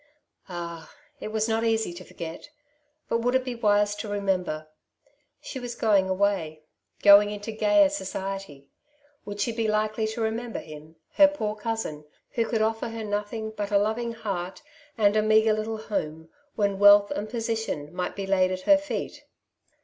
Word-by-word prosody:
Ah! 170 -2 -7 0.3
it - - -5
was 215 0 -1
not 225 0 0
easy 225 -5 +1
to 180 +1 -9
forget; 165 - -8 0.6
but 230 - 0
would 245 +2 +1
it 260 0 +2
be 250 - -3
wise 205 -2 +2
to 215 - -5
remember? 185 -6 -1 0.7
She 265 - -7
was 245 -1 -6
going 200 -4 +2
away, 185 -6 0 0.4
going 205 0 +8
into 210 +1 -5
gayer 305 +7 +4
society; 195 - -5 0.6
would 205 0 -7
she 220 +4 0
be 225 -1 -1
likely 215 +1 0
to 220 +2 -4
remember 225 +1 -2
him, 155 +1 -10 0.2
her 295 - +9
poor 220 -8 -3
cousin, 215 -9 -4 0.3
who 230 -1 0
could 220 -2 +1
offer 225 +1 -1
her 225 0 -6
nothing 210 +1 -3
but 205 -2 -4
a 205 - +3
loving 220 +3 0
heart 195 -4 -5 0.3
and 205 -1 +3
a 215 - +4
meagre 215 0 +4
little 215 +1 -2
home, 160 -7 -4 0.3
when 200 -2 0
wealth 205 0 +7
and 210 +1 -3
position 225 -10 -3
might 180 0 -3
be 195 - -4
laid 190 -1 +3
at 185 0 -3
her 295 +8 +6
feet 295 - -5
210 Hz, 170 wpm, -26 LUFS, 190-225 Hz, 0.7 s, her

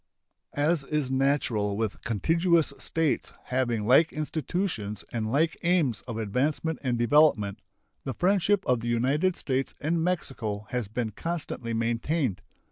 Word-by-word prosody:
As 150 +1 +2
is 150 -3 -1
natural 130 -7 +1
with 110 -2 -2
contiguous 165 - +2
states 165 -3 -1
having 120 -4 -1
like 135 +8 +5
institutions 155 - -3
and 110 -2 -2
like 160 +5 +2
aims 160 - +2
of 115 -3 -4
advancement 140 +9 -1
and 125 -3 0
development, 120 -6 +3 0.4
the 135 - -4
friendship 195 +1 +2
of 125 -2 +2
the 115 - -5
United 140 +10 +2
States 135 -1 -2
and 160 +2 0
Mexico 120 - -2
has 125 -4 -1
been 110 +1 -3
constantly 135 -5 -4
maintained. 115 - 0
135 Hz, 130 wpm, -27 LUFS, 115-160 Hz, 0.4 s, like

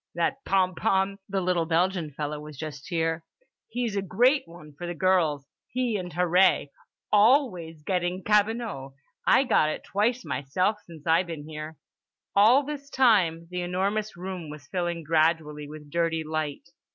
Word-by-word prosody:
"That 175 +11 -1
Pompom, 190 +1 +1
the 195 -1 0
little 175 -2 +1
Belgian 175 0 +1
feller 150 +1 -4
was 150 -2 -10
just 145 -2 -7
here, 165 -1 -1 0.4
he's 235 -2 -2
a 200 - +1
great 245 - +2
one 165 -3 -13
for 175 +5 -7
the 175 - -4
girls. 165 -6 +2 0.2
He 250 -3 -1
and 180 -3 -4
Harree. 180 -3 +3 0.4
Always 205 - +3
getting 180 +1 -1
cabinot. 210 - 0 0.3
I - - +6
got 155 - +3
it - - -4
twice 230 +4 0
myself 155 +9 -1
since 160 -4 -13
I 165 +1 +4
been 165 -5 -7
here." 155 0 -7 0.6
All 225 +8 +6
this 285 -1 -6
time 190 -12 +3
the 180 0 -2
enormous 195 +3 -1
room 180 -3 -6
was 150 -1 -10
filling 175 0 -3
gradually 155 -1 +1
with 150 -1 -11
dirty 165 -1 0
light. 155 0 -4
175 Hz, 150 wpm, -27 LUFS, 155-200 Hz, 0.6 s, I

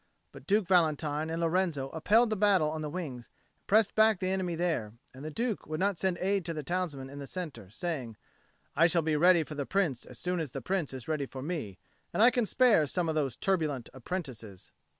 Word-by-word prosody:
But - - -14
Duke 205 0 +3
Valentine 155 -3 +2
and 165 +1 -2
Lorenzo 165 -5 0
upheld 220 - +3
the - - +1
battle 190 -7 +3
on 155 0 -4
the 150 - -3
wings, 145 -8 -5
and - - -41
pressed 210 0 +4
back 220 -2 +4
the 185 - -1
enemy 185 -3 -1
there; 160 -11 -1 0.2
and 130 +2 -11
the 155 - -4
Duke 225 +6 -3
would 155 0 -3
not 195 -2 0
send 190 -2 0
aid 195 +1 0
to 165 -1 -3
the 150 - -4
townsmen 165 -5 -3
in 140 +1 -9
the 140 - -7
centre, 145 - -6
saying 125 - -4 0.6
"I 165 +3 +6
shall 170 -1 +2
be 155 -1 +1
ready 175 +2 +5
for 155 - -9
the 145 -2 -4
Prince 170 -11 0
as 125 - -11
soon 180 +4 -2
as 155 -6 -4
the - - -3
Prince 185 -6 -1
is 130 - -8
ready 155 -3 -1
for 130 0 -8
me, 145 - -4 0.4
and 215 - +4
I 245 - +8
can 240 -2 0
spare 225 - +4
some 170 +3 -1
of - - 0
those 140 -6 -1
turbulent 155 -8 -1
apprentices." 130 - -7
165 Hz, 225 wpm, -30 LUFS, 140-185 Hz, 0.6 s, I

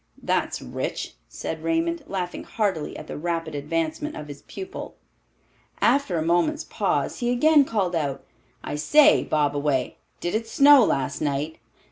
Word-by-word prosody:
That's - - -1
rich," - - -4 0.2
said - - -5
Raymond, 330 -1 0
laughing 180 -2 -4
heartily 195 -9 -2
at - - -8
the - - -7
rapid 165 -1 -2
advancement 165 - -2
of 150 -1 -8
his 145 -1 -9
pupil. 380 0 -8 0.8
After 275 -11 +2
a 160 - 0
moment's 175 - +1
pause, - - -1
he 240 -1 0
again 295 +3 +5
called 195 -8 -1
out, 140 -4 -2 0.4
"I 145 - -4
say, 295 - +5
Bobaway, 145 -3 0 0.2
did 175 - -3
it 225 +1 -1
snow 280 +1 +7
last 135 -10 -1
night?" 145 +2 -2
175 Hz, 145 wpm, -24 LUFS, -, 0.8 s, snow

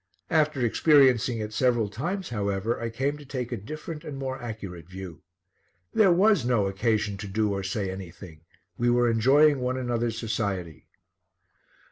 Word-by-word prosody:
After 155 -5 +2
experiencing 130 -2 +4
it 105 0 -5
several 120 -2 +2
times, 170 - -4
however, 105 0 -2
I 115 - -2
came 135 +6 -2
to - - -11
take 130 -3 -5
a - - -1
different 155 - -7
and 150 -4 -7
more 130 -1 -4
accurate 100 -8 -7
view. 95 -3 -9 0.7
There 200 -4 +5
was 195 - +4
no 120 -4 +2
occasion 105 +1 0
to 105 +1 -7
do 105 +1 0
or 100 - -2
say 95 0 -2
anything. 90 -3 -10 0.4
We 120 0 +2
were 120 0 +3
enjoying 140 +6 +4
one 125 +1 -1
another's 120 -3 -1
society. 100 - -3
115 Hz, 155 wpm, -26 LUFS, 100-135 Hz, 0.7 s, There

